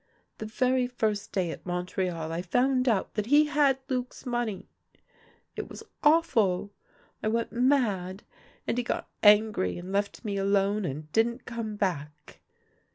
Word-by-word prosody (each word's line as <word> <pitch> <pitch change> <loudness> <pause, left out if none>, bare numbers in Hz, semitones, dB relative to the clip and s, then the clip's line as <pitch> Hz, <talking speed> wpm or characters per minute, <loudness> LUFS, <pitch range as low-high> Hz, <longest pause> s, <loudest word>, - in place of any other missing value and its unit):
The 215 - -5
very 255 +2 +1
first 220 -4 -2
day 180 -4 0
at - - -9
Montreal 180 -2 -3
I 165 +1 -2
found 255 +7 +2
out 210 -5 0
that 210 0 -2
he 295 +3 +6
had 290 -2 +3
Luc's 255 0 -4
money. 240 -6 -2 0.9
It - - -5
was - - -9 0.2
awful; 225 - +3 0.5
I - - -1
went 230 +1 0
mad, 225 -7 +1 0.4
and 245 - 0
he - - 0
got - - -3
angry 210 - +4
and 180 +2 -7
left 200 +4 -2
me 200 -2 -2
alone, 200 +1 +1
and 150 0 -5
didn't 235 +4 +1
come 230 -3 -4
back. 150 -7 -4
215 Hz, 150 wpm, -28 LUFS, 185-245 Hz, 0.9 s, he